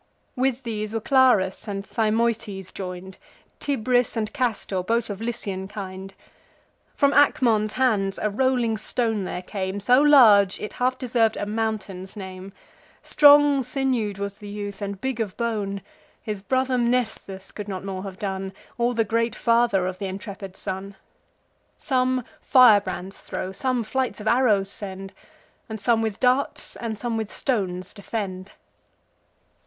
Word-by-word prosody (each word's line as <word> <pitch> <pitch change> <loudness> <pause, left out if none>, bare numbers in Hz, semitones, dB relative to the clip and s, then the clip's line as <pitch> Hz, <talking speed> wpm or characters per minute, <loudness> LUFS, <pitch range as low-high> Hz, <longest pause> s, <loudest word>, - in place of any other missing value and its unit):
With 260 0 0
these 215 -2 -4
were - - +1
Clarus 220 -5 +3
and 200 -1 -4
Thymoetes 215 -4 -1
join'd; 185 0 -7 0.4
Tibris 250 -4 +1
and 215 -1 -2
Castor, 230 -8 -1
both 230 +3 0
of 200 +1 -7
Lycian 205 -5 -4
kind. 195 -1 -8 0.8
From 280 0 +3
Acmon's 230 -7 +3
hands 210 -7 +1
a 210 - 0
rolling 245 -1 +1
stone 220 -2 0
there 180 0 -5
came, 190 0 -4
So 250 +6 +4
large, 220 -10 +6
it 210 - -6
half 255 +1 +2
deserv'd 235 -4 +1
a - - -2
mountain's 205 -3 -3
name: 190 -1 -8 0.5
Strong 290 -1 +6
sinew'd 250 -5 -1
was 200 0 -5
the 205 - -9
youth, 205 0 -6
and 200 -1 -4
big 265 0 -3
of 210 -4 -3
bone; 210 -4 -2 0.4
His 210 -3 -5
brother 260 +3 0
Mnestheus 225 -5 -1
could 210 -1 -7
not 190 -1 -5
more 190 -1 -4
have 190 -1 -7
done, 190 -1 -4 0.3
Or 240 +1 +1
the 225 -1 +2
great 230 +2 0
father 230 -5 +2
of 185 0 -4
th' 195 -2 -3
intrepid 195 0 -8
son. 195 0 -5 0.8
Some 255 -2 0 0.2
firebrands 200 -7 +4
throw, 185 - -5
some 250 +4 -1
flights 260 +3 -2
of 210 - -8
arrows 220 -5 +3
send; 195 -1 -7 0.6
And 220 0 -5
some 225 +2 +2
with 220 -3 -2
darts, 255 +2 +1
and 225 -2 -4
some 235 0 -2
with 220 -2 -4
stones 185 -7 -2
defend. 195 -2 -5
215 Hz, 145 wpm, -24 LUFS, 195-245 Hz, 0.8 s, large